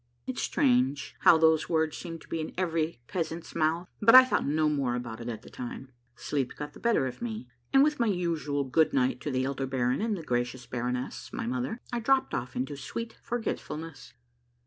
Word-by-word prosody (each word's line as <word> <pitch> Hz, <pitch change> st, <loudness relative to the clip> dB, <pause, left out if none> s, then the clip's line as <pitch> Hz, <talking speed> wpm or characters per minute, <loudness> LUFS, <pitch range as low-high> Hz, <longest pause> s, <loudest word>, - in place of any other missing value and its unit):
It's 125 Hz, -1 st, -3 dB
strange 130 Hz, +2 st, +2 dB
how 165 Hz, -, +7 dB
those 160 Hz, -1 st, +3 dB
words 160 Hz, -2 st, +1 dB
seem 165 Hz, -2 st, -6 dB
to -, -, -17 dB
be 165 Hz, -, -2 dB
in 155 Hz, -, -6 dB
every 165 Hz, -5 st, -1 dB
peasant's 165 Hz, -1 st, -4 dB
mouth, 165 Hz, +2 st, +1 dB
but 230 Hz, +3 st, +7 dB
I 255 Hz, 0 st, +11 dB
thought 255 Hz, -, 0 dB
no 155 Hz, +2 st, +2 dB
more 140 Hz, -5 st, 0 dB
about 120 Hz, -2 st, -5 dB
it 115 Hz, -, -5 dB
at 110 Hz, -2 st, -6 dB
that -, -, -14 dB
time. 130 Hz, +1 st, -7 dB, 0.2 s
Sleep 135 Hz, 0 st, -2 dB
got 145 Hz, 0 st, -6 dB
the -, -, -13 dB
better 235 Hz, -, +2 dB
of 130 Hz, -, -6 dB
me, 220 Hz, -, -4 dB, 0.2 s
and 270 Hz, -, +6 dB
with 300 Hz, -1 st, +1 dB
my 235 Hz, -, +3 dB
usual 165 Hz, -7 st, 0 dB
good 155 Hz, -, +2 dB
night 260 Hz, -1 st, +1 dB
to -, -, -3 dB
the 130 Hz, -1 st, 0 dB
elder 135 Hz, 0 st, -2 dB
baron 125 Hz, +1 st, 0 dB
and 220 Hz, -2 st, 0 dB
the 165 Hz, -, -7 dB
gracious 125 Hz, -1 st, -2 dB
baroness, 125 Hz, +1 st, -4 dB
my -, -, -4 dB
mother, 125 Hz, -, -2 dB, 0.2 s
I 240 Hz, -, 0 dB
dropped 265 Hz, +3 st, +2 dB
off 125 Hz, +1 st, -3 dB
into 135 Hz, +3 st, -2 dB
sweet 225 Hz, -, -6 dB
forgetfulness. 160 Hz, -, -5 dB
150 Hz, 205 wpm, -29 LUFS, 130-180 Hz, 0.2 s, I